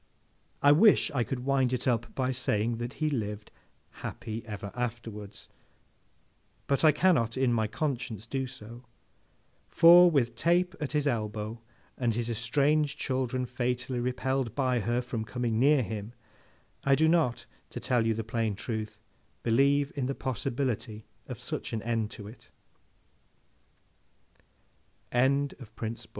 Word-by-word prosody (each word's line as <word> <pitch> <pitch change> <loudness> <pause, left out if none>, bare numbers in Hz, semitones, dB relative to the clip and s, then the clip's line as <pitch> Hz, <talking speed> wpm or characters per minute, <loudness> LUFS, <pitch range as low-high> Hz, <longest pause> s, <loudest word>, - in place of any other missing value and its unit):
I 145 - +7
wish 195 +6 +5
I 130 -5 +1
could 125 +1 -4
wind 135 -2 +2
it 125 - -2
up 120 -2 0
by 130 -1 0
saying 115 -3 0
that 120 +2 -5
he 155 - -1
lived 105 -5 -4 0.5
happy 110 +1 -5
ever 100 -1 -6
afterwards, 115 -4 -6 1.2
but 140 +2 0
I 155 - +8
cannot 145 -8 +2
in 130 -2 +2
my 110 -2 +1
conscience 125 -4 -3
do 130 +2 -3
so; 120 0 -11 0.9
for, 175 +1 +8
with 130 -7 +1
Tape 175 +6 +2
at 150 -2 -4
his 150 -1 +1
elbow, 110 -3 -2 0.4
and 120 -3 +1
his 120 0 -2
estranged 140 +6 +1
children 130 -1 -1
fatally 125 0 -2
repelled 125 -1 -1
by 130 -3 +1
her 120 +3 0
from 120 -2 -4
coming 115 -1 -2
near 140 +1 +4
him, 105 +2 -6 0.7
I 140 0 +4
do 160 +3 +3
not, 155 -8 +2 0.2
to - - -6
tell 120 0 +1
you 110 - +1
the 115 - -3
plain 110 -2 -1
truth, 110 0 -5 0.4
believe 140 +4 +3
in 135 -3 -1
the 135 - -2
possibility 120 -4 -3 0.2
of - - -6
125 Hz, 125 wpm, -29 LUFS, 115-135 Hz, 1.2 s, I